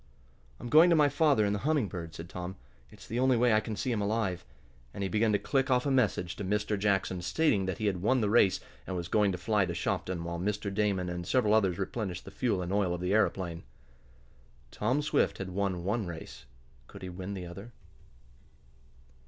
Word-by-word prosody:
"I'm - - -7
going 160 +5 +7
to 170 - +5
my 150 -2 +5
father 145 -6 +3
in 100 - +1
the 105 - -1
Humming 145 -1 +1
Bird," 85 -4 -7
said 80 - -8
Tom. 90 +2 -6 0.3
"It's - - -14
the 115 - -3
only 130 -1 +3
way 120 -1 +4
I 110 - +5
can 110 0 -5
see 105 +6 -2
him 110 -3 0
alive," 100 -4 -1 0.5
and 100 - -3
he 95 - -1
began 110 +3 +2
to - - +4
click 135 +5 0
off 125 0 +2
a 140 - +1
message 100 -8 +1
to 105 - -4
Mr. 105 +2 0
Jackson, 95 -3 0
stating 95 - +1
that 95 - -2
he 110 - -3
had 95 -4 0
won 130 +6 +2
the 105 - +1
race 105 -5 +4 0.3
and 95 - -3
was 85 -1 -3
going 105 +1 +2
to 90 - -3
fly 105 0 +1
to 85 - -4
Shopton, 90 0 -2
while 85 0 -4
Mr. 100 +1 -2
Damon 100 -3 0
and 90 -1 -5
several 115 -5 +2
others 95 -5 +3
replenished 95 -2 -4
the 95 - -9
fuel 100 -3 -1
and 90 +2 -3
oil 95 -4 +1
of 90 - -7
the 90 +2 0
aeroplane. 95 -6 0 1.1
Tom 125 +8 0
Swift 150 - +1
had 95 -1 -5
won 95 -2 -1
one 105 +2 -1
race. 80 -5 -9 0.4
Could - - -12
he 95 - -5
win 95 +2 -6
the 90 -2 -6
other? 100 +7 -9
100 Hz, 220 wpm, -30 LUFS, 90-115 Hz, 1.1 s, going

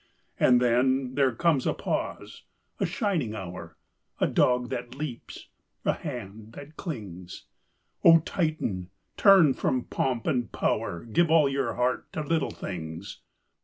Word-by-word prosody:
and 125 -1 +5
then 125 +2 +2
There 135 -1 +3
comes 155 -2 +2
a - - +1
pause, - - -4 0.4
a - - +1
shining 170 - -1
hour, 90 -4 -8 0.4
A - - +3
dog 125 0 +2
that 125 -1 -5
leaps, 140 -4 -7 0.4
a - - +3
hand 110 - -8
that 145 +4 -11
clings: 100 - -7 0.6
O 165 -1 +8
Titan, 155 - -2 0.3
turn 190 -9 +6
from 130 -1 -1
pomp 125 -4 -2
and 120 -5 0
power; 85 +6 -1
Give 155 +9 +2
all 160 -3 +5
your 135 0 -1
heart 125 +1 -1
to 155 - -2
Little 160 +2 0
Things. 80 +1 -7
125 Hz, 135 wpm, -27 LUFS, 110-150 Hz, 0.6 s, O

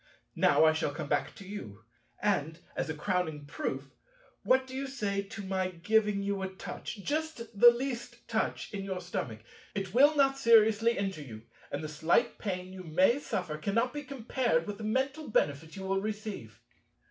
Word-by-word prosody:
Now - - +5
I 155 - +6
shall 160 -2 0
come 150 0 -5
back 145 0 0
to 195 - -11
you. 115 - -8 0.4
And, 160 -6 +1 0.2
as - - -2
a 160 - -2
crowning 160 -3 -1
proof, 300 - -4 0.5
what 260 0 +3
do 260 0 -9
you 275 +1 -2
say 205 -7 -1
to 210 +2 -8
my 190 -1 0
giving 200 +3 +1
you 200 -1 -1
a 190 - -2
touch, 190 +2 -7
just 315 +4 -1 0.2
the 240 - +11
least 240 0 -4
touch, - - -1
in 195 -1 -3
your 190 -2 -3
stomach? 110 -10 -4 0.3
It 195 -2 -3
will 285 +5 +6
not 270 -1 +3
seriously 225 -1 +5
injure 195 -5 -2
you, 110 -6 -9 0.3
and 145 +2 -3
the - - -3
slight 160 +10 +1
pain 185 -2 -4
you 190 - -8
may 185 - +3
suffer 170 - -3
cannot 230 +9 +1
be 295 - -3
compared 245 - 0
with 205 -1 -6
the - - -6
mental 265 +7 -1
benefit 160 -4 0
you 190 - -6
will 195 0 0
receive." 210 - -5
200 Hz, 180 wpm, -31 LUFS, 165-235 Hz, 0.5 s, the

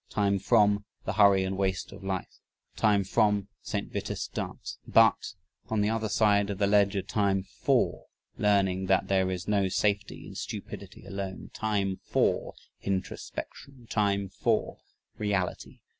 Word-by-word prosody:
Time 100 -1 +1
FROM 105 0 +3 0.2
the 95 - -1
"hurry 100 -2 +5
and 95 0 -2
waste 95 -1 -1
of 100 0 -11
life." 95 -2 -4 0.4
Time 105 -3 +3
FROM 105 +1 +2
the 100 - -19
"St. - - -4
Vitus - - -3
Dance." - - -6
BUT, - - +4 0.3
on 110 -2 0
the 105 +1 +2
other 110 -1 -1
side 100 -2 +3
of 100 - -3
the 100 - +2
ledger, 100 -1 +3
time 100 -2 +1
FOR - - 0 0.3
learning 95 -2 +2
that 95 0 +2
"there 95 -1 +2
is 90 -2 -4
no 100 -2 +2
safety 100 +2 -1
in - - -10
stupidity - - -7
alone." 95 -1 -6
Time 100 -3 -1
FOR - - 0 0.3
introspection. 115 +6 -5
Time 100 -2 +1
FOR 95 0 -1 0.4
reality. 100 -4 -2
100 Hz, 145 wpm, -28 LUFS, 95-105 Hz, 0.4 s, hurry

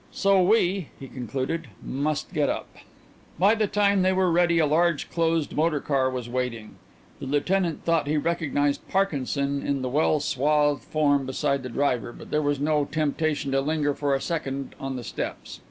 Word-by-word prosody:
"So 195 -1 +3
we," 185 -3 +2
he 135 - -8
concluded, 130 +6 -4 0.2
"must 145 +3 -2
get - - +1
up." - - -3 0.7
By 200 +4 +5
the 220 -2 +1
time 200 -1 +2
they 185 +1 +3
were 185 -1 +2
ready 170 0 +3
a 160 - +4
large 165 +1 +1
closed 165 -2 0
motor 155 -1 +1
car 135 -2 +1
was 125 -2 -4
waiting. 120 -3 -4 0.4
The - - -6
lieutenant 165 +4 0
thought 165 -3 +1
he 150 +1 +1
recognized 145 -2 0
Parkinson 140 -6 0
in 140 -2 -1
the 130 - -1
well 150 +3 +2
swathed 145 +1 +1
form 145 -3 +1
beside 140 +1 0
the 130 - -6
driver, 125 -3 0
but - - -12
there 150 - +2
was 145 -2 0
no 150 0 +1
temptation 155 -1 -1
to 135 0 +2
linger 145 0 0
for 140 -1 0
a 135 - -2
second 140 -5 -3
on 135 -1 -4
the 125 - -5
steps. - - -6
145 Hz, 180 wpm, -25 LUFS, 135-165 Hz, 0.7 s, By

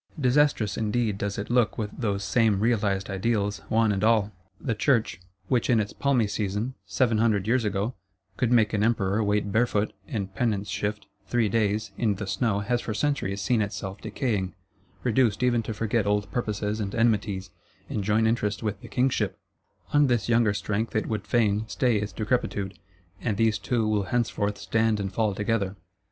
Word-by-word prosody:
Disastrous 130 -5 +2
indeed 110 -1 0
does 100 0 -2
it 100 +3 -4
look 120 -2 +2
with 105 -2 -3
those 100 -5 -1
same 105 0 +2
"realised 100 -4 +1
ideals," 105 0 -1
one 110 -1 +3
and 100 0 -1
all! 110 -2 +3 0.3
The 120 - -1
Church, 110 -6 +1 0.3
which 125 -3 +1
in 120 -3 +4
its 105 -1 -2
palmy 135 -5 +2
season, 105 +4 -2
seven 115 -4 +2
hundred 110 -4 +2
years 120 +1 +2
ago, 105 +3 -1 0.4
could 125 +2 0
make 115 -3 +4
an 105 - +1
Emperor 110 -2 +1
wait 105 0 0
barefoot, 110 -1 +1
in 100 -4 -3
penance 105 -1 -1
shift; 105 +3 -2 0.2
three 115 -3 +1
days, 105 0 0
in 110 -4 +2
the 100 +1 -5
snow, 100 +2 0
has 120 +3 0
for 110 - -4
centuries 105 -6 -1
seen 110 +3 +2
itself 100 -1 -4
decaying; 105 -5 -2 0.5
reduced 120 -2 +2
even 120 -2 +3
to 110 - -5
forget 110 0 0
old 105 -1 0
purposes 105 -2 -2
and 100 -1 -3
enmities, 105 -5 +1 0.4
and 105 - -3
join 110 +3 +2
interest 105 -3 0
with 105 -2 -3
the - - -10
Kingship: 130 +1 0 0.6
on 145 -1 +5
this 120 -4 +1
younger 115 -3 +3
strength 105 +3 -2
it 110 - +1
would 105 -3 -3
fain 105 0 +2
stay 125 -2 +1
its 105 0 -3
decrepitude; 105 -4 -2 0.4
and 105 -4 -1
these 110 -1 +2
two 115 0 0
will 105 -2 +1
henceforth 105 -2 -1
stand 110 +1 +1
and 95 -1 -3
fall 110 -3 +1
together. 100 -2 -1
110 Hz, 175 wpm, -26 LUFS, 100-115 Hz, 0.6 s, on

